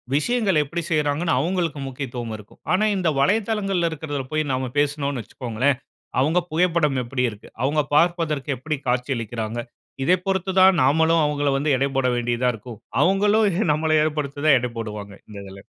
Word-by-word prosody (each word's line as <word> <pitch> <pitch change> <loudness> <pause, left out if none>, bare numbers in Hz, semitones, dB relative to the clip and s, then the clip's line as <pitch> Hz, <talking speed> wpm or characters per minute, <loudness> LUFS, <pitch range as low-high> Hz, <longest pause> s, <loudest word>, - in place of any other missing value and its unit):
விஷயங்களை 195 0 +2
எப்படி 170 +5 -4
செய்றாங்கனு 150 +2 +1
அவங்களுக்கு 165 -1 -1
முக்கியத்துவம் 125 -4 -5
இருக்கும். 105 0 -16
ஆனா 200 +4 +3
இந்த 175 -3 +1
வலைதளங்கள்ல 195 0 +1
இருக்கிறதுல 145 -3 -4
போயி 155 0 +1
நம்ம 130 -1 -2
பேசினோம்னு 145 -3 -1
வச்சுக்கோங்களேன். 125 +3 -1 0.4
அவங்க 160 +6 +3
புகைப்படம் 160 -5 +2
எப்படி 125 +1 -2
இருக்கு? 105 -1 -12 0.2
அவங்க 150 +3 +2
பார்ப்பதற்கு 165 -4 +1
எப்படி 155 +5 -3
காட்சியளிக்கிறாங்க. 120 -3 -2 0.4
இதை 180 +7 +4
பொருத்து 190 0 0
தான் 190 -1 +6
நாமளும் 160 +3 +3
அவங்கள 145 -1 0
வந்து 145 0 +1
எடை 140 +2 +1
போட 130 -1 +2
வேண்டியதா 120 +1 0
இருக்கும். 110 0 -10 0.2
அவங்களும் 205 +3 +3 0.3
நம்மள 155 +1 0
ஏற்படுத்தி 150 -2 -2
தான் 140 -4 +6
எடை 125 0 -3
போடுவாங்க. 105 -3 -6 0.2
இந்த 105 - -10
இதில. 95 0 -11
145 Hz, 150 wpm, -23 LUFS, 125-170 Hz, 0.4 s, தான்